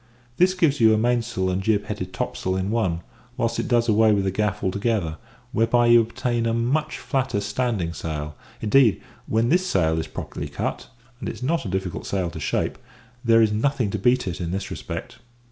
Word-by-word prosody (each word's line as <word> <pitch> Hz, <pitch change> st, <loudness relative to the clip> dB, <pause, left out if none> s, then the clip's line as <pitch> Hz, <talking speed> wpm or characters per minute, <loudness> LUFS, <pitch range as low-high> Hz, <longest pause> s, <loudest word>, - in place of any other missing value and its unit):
This 185 Hz, +1 st, +4 dB
gives 160 Hz, -6 st, +2 dB
you 110 Hz, -1 st, +6 dB
a -, -, +1 dB
mainsail 115 Hz, -4 st, 0 dB
and 90 Hz, +1 st, -1 dB
jib 105 Hz, 0 st, +1 dB
headed 95 Hz, -3 st, -5 dB
topsail 95 Hz, 0 st, -2 dB
in 95 Hz, +2 st, -1 dB
one, 95 Hz, -8 st, 0 dB, 0.4 s
whilst -, -, 0 dB
it -, -, -1 dB
does 120 Hz, -1 st, +2 dB
away 110 Hz, 0 st, +5 dB
with 100 Hz, -2 st, +2 dB
the 95 Hz, -, 0 dB
gaff 105 Hz, +1 st, -1 dB
altogether, 95 Hz, -4 st, -1 dB, 0.3 s
whereby 120 Hz, 0 st, +3 dB
you 120 Hz, 0 st, +7 dB
obtain 115 Hz, +1 st, -1 dB
a 115 Hz, -, +1 dB
much 130 Hz, +7 st, 0 dB
flatter 130 Hz, -6 st, -1 dB
standing 105 Hz, -4 st, -1 dB
sail; 75 Hz, -2 st, -5 dB, 0.3 s
indeed, 110 Hz, -1 st, +4 dB, 0.3 s
when 115 Hz, +2 st, +1 dB
this 180 Hz, +5 st, +3 dB
sail 80 Hz, -, +2 dB
is 80 Hz, -, -3 dB
properly -, -, -6 dB
cut -, -, -4 dB, 0.3 s
(and -, -, -4 dB
it -, -, -4 dB
is -, -, -9 dB
not 160 Hz, +1 st, 0 dB
a -, -, -3 dB
difficult 95 Hz, -1 st, -3 dB
sail 90 Hz, -4 st, -1 dB
to 80 Hz, -, -7 dB
shape), 70 Hz, -, -1 dB, 0.4 s
there 115 Hz, -1 st, +5 dB
is 110 Hz, -, +2 dB
nothing 115 Hz, 0 st, 0 dB
to 105 Hz, -, -2 dB
beat 125 Hz, +2 st, +2 dB
it 90 Hz, 0 st, -4 dB
in 85 Hz, -, -2 dB
this 95 Hz, +3 st, -3 dB
respect. -, -, -6 dB
110 Hz, 200 wpm, -24 LUFS, 95-120 Hz, 0.4 s, you